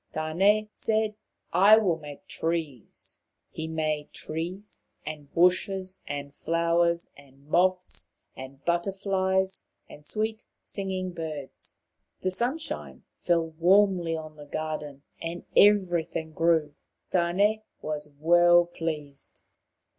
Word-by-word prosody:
Tane" 190 +7 +2
said, 220 -1 0 0.3
" - - -34 0.2
I 215 - +10
will 180 -7 +2
make 145 -2 -10
trees." 160 -8 -4 0.3
He 160 - -5
made 155 -2 -2
trees 175 +6 -5 0.2
and 150 -2 -7
bushes, 185 +2 +2 0.3
flowers 170 +2 +1
and 140 0 -19
moths 180 +3 +1 0.3
and 135 +1 -10
butter 175 +3 +1
flies, 190 -1 0 0.2
and 150 - -13
sweet 220 +6 -2 0.2
singing 190 -2 -3
birds. 155 -5 -7 0.4
The 185 - 0
sunshine 250 - -3 0.2
fell 170 -2 +2
warmly 175 +1 +3
on 155 -1 -9
the 145 -1 -11
garden, 150 -2 -5 0.2
and 170 +1 -5
everything 175 -6 +3
grew. 160 -2 +2 0.4
Tane 195 +5 +2 0.2
was 150 -1 -4
well 175 +2 +6
pleased. 155 -5 -5
170 Hz, 110 wpm, -27 LUFS, 155-190 Hz, 0.4 s, I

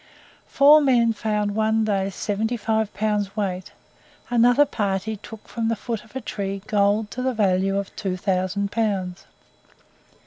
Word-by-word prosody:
Four 295 +2 +6
men 240 -5 +3
found 210 -1 -1
one 220 +1 +1
day 195 -2 0
seventy 215 +4 -2
five 220 -1 -1
pounds 210 -2 -1
weight; 185 -3 -3 0.6
another 245 +4 +5
party 205 -4 -2
took 220 +1 -12
from 230 -1 -3
the 230 - +1
foot 225 0 -5
of 225 +2 -21
a 265 - -3
tree 195 -3 -4
gold 210 -1 +1
to 255 - -5
the 255 -1 -1
value 195 -2 +1
of 200 -1 -4
2000 185 +1 -1
pounds. 195 -5 -2
210 Hz, 145 wpm, -23 LUFS, 195-225 Hz, 0.6 s, Four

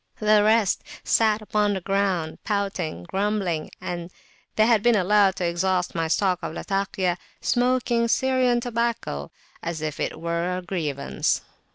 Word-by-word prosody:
The 215 0 +4
rest 215 -2 +3 0.2
sat 215 -1 +2
upon 210 -1 +1
the - - -1
ground, 190 -4 -1
pouting, 195 - -2
grumbling, 190 - -1
and 175 -1 -5 0.5
they 215 - +5
had 225 -2 +4
been 240 +1 +4
allowed 200 0 +4
to 180 - -2
exhaust 180 +1 0
my 165 -1 -1
stock 180 +2 +1
of 160 - -5
Latakia 195 -2 -1 0.2
smoking 245 -1 +1
Syrian 255 0 +2
tobacco 235 - -2 0.3
as 170 -1 -3
if 155 -1 -4
it - - -2
were 170 +2 -1
a 185 - -6
grievance. 155 -6 -1
195 Hz, 145 wpm, -24 LUFS, 170-215 Hz, 0.5 s, they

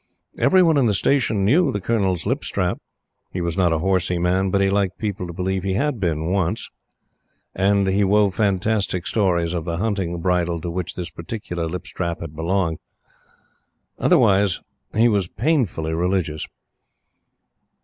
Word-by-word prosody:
Every 185 -1 +5
one 165 -3 +4
in 130 -4 +3
the 105 - +2
station 110 -3 +1
knew 145 - +4
the 105 - -2
Colonel's 95 -5 0
lip - - -1
strap. - - -1 0.5
He 90 - -4
was 85 -1 -2
not 90 -3 +2
a 80 - +2
horsey 90 0 +1
man, 90 +2 +1
but 100 - +1
he 100 - +3
liked 95 -1 0
people 100 -4 -3
to - - -6
believe 95 +2 -2
he 95 0 -1
had 140 +2 0
been 80 -5 0
on 80 +3 -2
once; 95 -3 -1 0.8
and 100 +1 +2
he 95 +2 +2
wove 100 0 +3
fantastic 100 -2 0
stories 90 -5 +1
of 85 -2 -2
the 85 0 -3
hunting 95 -4 -1
bridle 85 -1 0
to 85 - -4
which 90 0 -4
this 85 -3 -5
particular 85 -1 -5
lip 90 +3 -5
strap 85 -2 -4
had 80 -2 -8
belonged. 85 0 -1 1.2
Otherwise 100 -2 +3 0.4
he 115 +2 +5
was 100 -6 +1
painfully 105 - 0
religious. 85 -2 -1
95 Hz, 165 wpm, -22 LUFS, 85-100 Hz, 1.2 s, Every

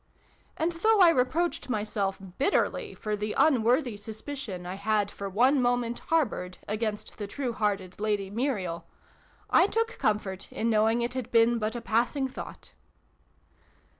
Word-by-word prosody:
And, 325 +2 +1
though 425 +6 +3
I 350 -3 +8
re 250 -6 +3
proached 335 +1 -2
myself, 210 -3 -1 0.2
bitterly, 340 +9 +1
for 215 -1 -2
the 210 +1 -3
unworthy 250 -3 +3
sus 215 +1 -8
picion 235 -11 -6
I 180 - -4
had 205 +1 0
for 200 0 -5
one 255 +8 +3
moment 245 -1 0
harboured 215 - 0
against 215 0 -3
the 205 - -3
true 250 +3 -3
hearted 200 -4 -2
Lady 205 -2 -1
Muriel, 195 -9 -2 0.6
I 360 - +6
took 455 +2 -1
comfort 200 -3 -1
in 230 +1 0
knowing 220 +2 +3
it 240 +1 -2
had 255 -3 -4
been 230 0 +4
but 215 +1 -2
a 240 - -4
passing 245 +5 +1
thought. 260 - -9
225 Hz, 155 wpm, -28 LUFS, 205-260 Hz, 0.6 s, I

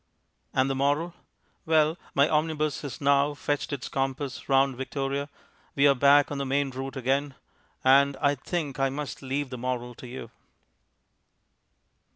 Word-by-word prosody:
And 130 0 +2
the 135 - 0
moral? 145 +5 0 0.5
Well, 160 -1 +3 0.2
my 140 +1 +5
omnibus 155 -1 0
has 140 -3 -6
now; 140 +1 +3
fetched 145 0 -2
its 140 -3 -4
compass 135 +1 -3
round 135 -1 +3
Victoria, 135 +2 -3 0.5
we 140 - +4
are 140 - +6
back 140 +2 +5
on 145 - -3
the - - -1
main 135 +1 0
route 135 +2 -6
again, 135 +2 -1 0.5
and 140 +1 +5
I 145 -1 +2
think 145 0 -4
I 135 0 +2
must 140 +1 -5
leave 135 0 -3
the 125 - -6
moral 125 -1 -3
to 125 - -11
you. 120 -2 -8
140 Hz, 155 wpm, -27 LUFS, 135-145 Hz, 0.5 s, are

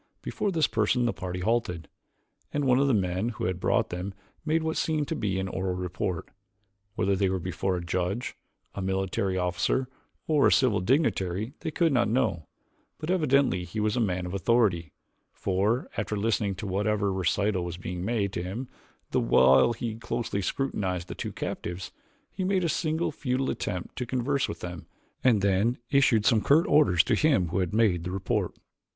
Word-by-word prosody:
Before 205 - -2
this 160 -4 +3
person 115 +3 +1
the 120 - +1
party 90 0 -5
halted, 90 -6 -1 0.6
and 145 -1 -1
one 125 0 +4
of 140 - +3
the 135 - +3
men 95 +2 0
who 115 - -6
had 90 -1 -1
brought - - +1
them 90 +2 -4 0.3
made 160 +1 +1
what 160 0 -1
seemed 155 -3 0
to 165 - -1
be 100 -8 -1
an 95 - -2
oral 95 0 -2
report. 90 -1 -3 0.7
Whether 100 0 +1
they 95 0 +1
were 95 - 0
before 95 +1 -2
a 85 - -5
judge, 90 +7 -2 0.4
a 100 - -5
military 95 0 -1
officer, 90 +8 0 0.4
or 150 -3 +4
a - - +3
civil 125 -7 +3
dignitary 105 - 0
they 165 - -3
could 165 -1 +1
not 120 -3 +2
know, 110 - 0 0.5
but 155 +3 -3
evidently 140 - +2
he 90 +5 -5
was 105 +1 +1
a - - +1
man 95 -5 0
of 90 - -5
authority, 100 -6 +2 0.4
for, 100 +6 0
after 105 - -2
listening 105 -2 0
to 90 - -6
whatever 100 +1 0
recital 95 +1 0
was 85 -1 -5
being 90 0 -5
made 100 -2 -1
to - - -2
him 105 +9 -5 0.4
the - - +2
while 65 - +5
he 115 0 -4
closely 115 -2 -3
scrutinized 95 -7 -2
the - - -4
two - - -5
captives, 90 +2 -5 0.4
he 190 - -4
made 185 0 +1
a 170 - +1
single 160 +1 0
futile 130 -2 -1
attempt 90 -1 -4
to 125 - -3
converse 130 +3 0
with 85 - -6
them 85 -2 -7 0.4
and 115 -6 +4
then 100 +5 +2
issued 135 -6 +4
some 110 -2 +4
curt 155 +8 +4
orders 140 - +4
to - - 0
him 140 - +3
who 90 - -1
had 90 -1 0
made 105 -6 +2
the 90 - -4
report. 95 0 -1
100 Hz, 185 wpm, -27 LUFS, 90-130 Hz, 0.7 s, while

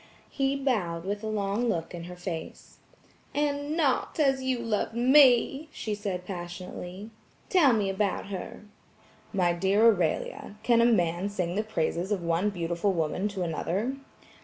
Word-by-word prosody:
He 275 0 0
bowed 200 -12 -1
with 205 +2 -3
a - - -3
long 215 +2 0
look 165 -3 -2
in 170 -1 -6
her 180 +1 -8
face. 175 -2 -7 0.6
"And 290 +1 -1
NOT 290 -1 +1
as 270 -3 +3
you 260 -1 0
loved 230 -1 -2
ME!" 265 +3 +5
she 215 -7 -4
said 195 -3 -4
passionately. 180 +2 -7 0.4
"Tell 335 -8 +5
me 215 -4 +1
about 195 0 -1
her." 200 +2 -7 0.7
"My 180 -4 +2
dear 195 +5 +3
Aurelia, 200 -1 +1
can 235 -1 +4
a - - +5
man 180 -4 +2
sing 180 -4 -2
the 205 - +1
praises 185 -2 -2
of 195 -4 0
one 170 +4 +1
beautiful 175 +1 -1
woman 170 +4 -1
to 200 -3 -3
another?" 190 - -2
205 Hz, 155 wpm, -28 LUFS, 175-240 Hz, 0.7 s, ME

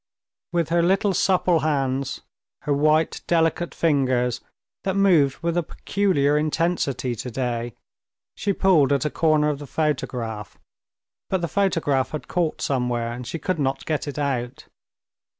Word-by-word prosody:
With 170 -3 0
her 170 +1 +3
little 195 +3 +2
supple 180 -2 +2
hands, 135 -3 -1 0.4
her 150 - +1
white, 155 +2 +2
delicate 165 0 +1
fingers, 130 -6 +1 0.4
that 190 -1 -1
moved 170 -9 +4
with 170 0 0
a 175 - +2
peculiar 150 -4 +1
intensity 155 -5 0
today, 120 -1 -3 0.6
she 200 - -1
pulled 180 -8 +3
at 140 +1 +1
a 150 - 0
corner 155 -2 +2
of 145 -2 -2
the 145 - -8
photograph, 125 -8 -3 0.7
but 190 -2 0
the 170 - -1
photograph 165 -8 +1
had 155 - -6
caught 170 -3 -1
somewhere, 125 -3 -1
and 120 0 -7
she 165 - -4
could 165 +2 -2
not 135 -1 -1
get 155 -1 -2
it 145 - -5
out. 130 -3 -2
150 Hz, 145 wpm, -23 LUFS, 130-170 Hz, 0.7 s, moved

